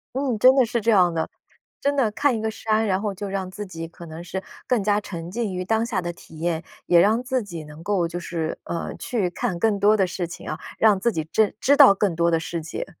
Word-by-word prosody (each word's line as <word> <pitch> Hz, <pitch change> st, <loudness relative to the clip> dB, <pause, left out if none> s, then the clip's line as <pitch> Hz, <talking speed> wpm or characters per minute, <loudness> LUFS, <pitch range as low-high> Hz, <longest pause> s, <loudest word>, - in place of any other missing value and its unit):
嗯， 260 Hz, -5 st, -1 dB
真 255 Hz, +4 st, +7 dB
的 260 Hz, -, +5 dB
是 235 Hz, 0 st, -1 dB
这 230 Hz, -, 0 dB
样 180 Hz, -5 st, +4 dB
的。 160 Hz, -1 st, -2 dB, 0.5 s
真 285 Hz, 0 st, +1 dB
的 235 Hz, -6 st, +2 dB
看 285 Hz, +2 st, +1 dB
一 -, -, -4 dB
个 220 Hz, 0 st, -1 dB
山， 220 Hz, +1 st, 0 dB
然 190 Hz, 0 st, +1 dB
后 210 Hz, -2 st, -2 dB
就 200 Hz, +1 st, -6 dB
让 190 Hz, -1 st, -3 dB
自 205 Hz, +2 st, -7 dB
己 165 Hz, -3 st, -7 dB
可 170 Hz, 0 st, -12 dB
能 160 Hz, +2 st, -8 dB
是 190 Hz, +2 st, -5 dB, 0.2 s
更 235 Hz, -6 st, +1 dB
加 205 Hz, 0 st, +2 dB
沉 175 Hz, -4 st, -7 dB
浸 225 Hz, -3 st, -2 dB
于 180 Hz, 0 st, -3 dB
当 220 Hz, +4 st, +1 dB
下 210 Hz, -6 st, -1 dB
的 175 Hz, 0 st, -3 dB
体 160 Hz, -2 st, -14 dB
验， 165 Hz, 0 st, -1 dB, 0.3 s
也 175 Hz, -1 st, +6 dB
让 220 Hz, +6 st, +3 dB
自 255 Hz, 0 st, 0 dB
己 170 Hz, -7 st, -7 dB
能 150 Hz, +1 st, -12 dB
够 195 Hz, -3 st, +1 dB
就 175 Hz, +1 st, -5 dB
是， 165 Hz, -2 st, -4 dB
呃， 170 Hz, -, -4 dB
去 210 Hz, -7 st, -1 dB
看 175 Hz, 0 st, -2 dB
更 205 Hz, +2 st, +1 dB
多 210 Hz, +2 st, +5 dB
的 195 Hz, -3 st, +3 dB
事 175 Hz, 0 st, -3 dB
情 170 Hz, -, -9 dB
啊， 155 Hz, -, -4 dB, 0.2 s
让 210 Hz, -3 st, +4 dB
自 235 Hz, -, +2 dB
己 160 Hz, -5 st, -2 dB
真 215 Hz, -2 st, +2 dB
知 285 Hz, +2 st, +4 dB
道 270 Hz, -8 st, +9 dB
更 195 Hz, -2 st, 0 dB
多 170 Hz, +1 st, +2 dB
的 165 Hz, -, +3 dB
世 165 Hz, +1 st, -4 dB
界。 155 Hz, -, -5 dB
195 Hz, 275 characters per minute, -23 LUFS, 170-220 Hz, 0.5 s, 道